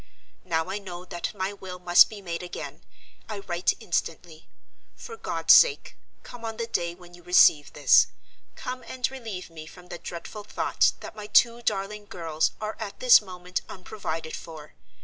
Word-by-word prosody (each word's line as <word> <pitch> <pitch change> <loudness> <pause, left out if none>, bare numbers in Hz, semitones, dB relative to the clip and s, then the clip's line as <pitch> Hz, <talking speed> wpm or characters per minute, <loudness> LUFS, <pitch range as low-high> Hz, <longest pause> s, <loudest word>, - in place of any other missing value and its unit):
Now 165 0 -1
I 200 - -3
know 180 -2 -8
that 175 -1 -4
my 190 +1 -2
will 190 -2 -8
must 175 -1 +6
be 210 -2 -10
made 170 -2 -4
again, 180 - -8 0.5
I 215 - -4
write 180 -3 0
instantly. 165 -5 -4 0.5
For 455 - -9
God's - - +3
sake, 470 -4 +5 0.3
come 245 -1 -11
on 225 -1 -5
the 230 - -2
day 170 -6 -2
when 175 -1 -16
you 175 - -14
receive 165 -4 +5
this—come 255 0 +1
and 255 0 -2
relieve 220 -10 -7
me 155 -1 -10
from 180 +1 -14
the 175 - -7
dreadful 175 +5 -8
thought 205 - +1
that - - -9
my 210 -1 -8
two 235 +2 +4
darling 205 -1 -2
girls 160 -4 -1
are 215 0 -4
at 205 -3 -6
this 250 -3 +8
moment 180 -2 -5
unprovided 165 -5 -5
for. 155 -2 -10
185 Hz, 170 wpm, -26 LUFS, 175-215 Hz, 0.5 s, this